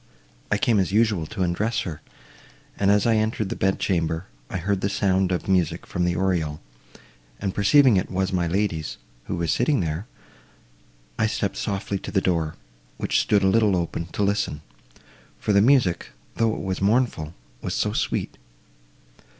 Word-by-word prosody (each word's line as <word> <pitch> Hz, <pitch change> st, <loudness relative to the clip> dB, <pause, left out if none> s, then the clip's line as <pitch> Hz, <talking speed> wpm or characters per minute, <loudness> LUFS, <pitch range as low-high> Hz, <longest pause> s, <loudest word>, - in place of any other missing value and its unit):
I -, -, +3 dB
came 115 Hz, -4 st, +2 dB
as 95 Hz, -1 st, 0 dB
usual 105 Hz, -6 st, +2 dB
to 105 Hz, -4 st, -3 dB
undress 100 Hz, +7 st, 0 dB
her, 80 Hz, -4 st, -6 dB, 0.7 s
and, 100 Hz, -, +1 dB
as 100 Hz, 0 st, +4 dB
I 115 Hz, -1 st, +3 dB
entered 110 Hz, -2 st, 0 dB
the -, -, -3 dB
bed 95 Hz, 0 st, +1 dB
chamber, 85 Hz, -2 st, -1 dB, 0.2 s
I -, -, -3 dB
heard 95 Hz, +2 st, -1 dB
the 100 Hz, -, 0 dB
sound 95 Hz, -1 st, +1 dB
of 90 Hz, -, -2 dB
music 90 Hz, -5 st, +1 dB
from 90 Hz, -, -1 dB
the 90 Hz, 0 st, +1 dB
oriel, 85 Hz, -5 st, 0 dB, 0.8 s
and 95 Hz, -, -2 dB
perceiving 115 Hz, +3 st, +5 dB
it 95 Hz, -, -1 dB
was 95 Hz, +1 st, -1 dB
my 90 Hz, -2 st, +1 dB
lady's, 85 Hz, -4 st, -1 dB, 0.3 s
who -, -, -3 dB
was 85 Hz, -2 st, 0 dB
sitting 145 Hz, -5 st, +2 dB
there, 85 Hz, +5 st, -2 dB, 1.1 s
I 110 Hz, -, +3 dB
stepped 100 Hz, -2 st, -2 dB
softly 100 Hz, -1 st, -2 dB
to -, -, -7 dB
the 100 Hz, -, +3 dB
door, 85 Hz, -5 st, 0 dB, 0.4 s
which -, -, +1 dB
stood 100 Hz, -2 st, +2 dB
a -, -, +4 dB
little 105 Hz, -2 st, +3 dB
open, 85 Hz, -1 st, -3 dB
to 100 Hz, -, -2 dB
listen; 100 Hz, -7 st, -1 dB, 0.7 s
for 105 Hz, -, 0 dB
the 100 Hz, -, +5 dB
music—though 115 Hz, -, +1 dB
it -, -, -4 dB
was 95 Hz, -1 st, -3 dB
mournful—was 80 Hz, -, -1 dB
so -, -, 0 dB
sweet! -, -, -2 dB
95 Hz, 165 wpm, -24 LUFS, 85-105 Hz, 1.1 s, perceiving